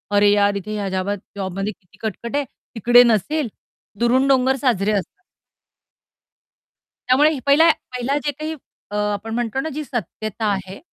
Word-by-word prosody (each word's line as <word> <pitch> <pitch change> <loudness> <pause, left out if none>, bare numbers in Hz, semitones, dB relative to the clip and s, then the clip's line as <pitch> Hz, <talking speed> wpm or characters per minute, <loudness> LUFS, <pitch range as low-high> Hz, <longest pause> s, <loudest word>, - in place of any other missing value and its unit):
"अरे 205 0 +5
यार 205 0 +3
इथे 215 +2 -5
ह्या 200 -2 -2
जाबात 190 +2 -1 0.2
जॉबमध्ये 195 +1 -3
किती 185 +2 -27
कटकट 230 +4 -4
आहे 290 - +1 0.3
तिकडे 240 +3 +6
नसेल." 235 - +1 0.5
"दुरून 255 +3 +3
डोंगर 265 0 +3
साजरे" 225 -7 +1
असतात. 200 -3 -3 1.9
त्यामुळे 295 +3 +4
पहिला 310 +4 +6 0.2
पहिला 250 +3 -1
जे 290 - +1
काही 310 +3 -5 0.4
अ, - - -4
आपण 210 +1 -2
म्हणतो 240 +2 -1
ना 315 - -2
जी 305 - -3
सत्यता 220 - -4
आहे 190 0 -4
225 Hz, 150 wpm, -21 LUFS, 200-265 Hz, 1.9 s, तिकडे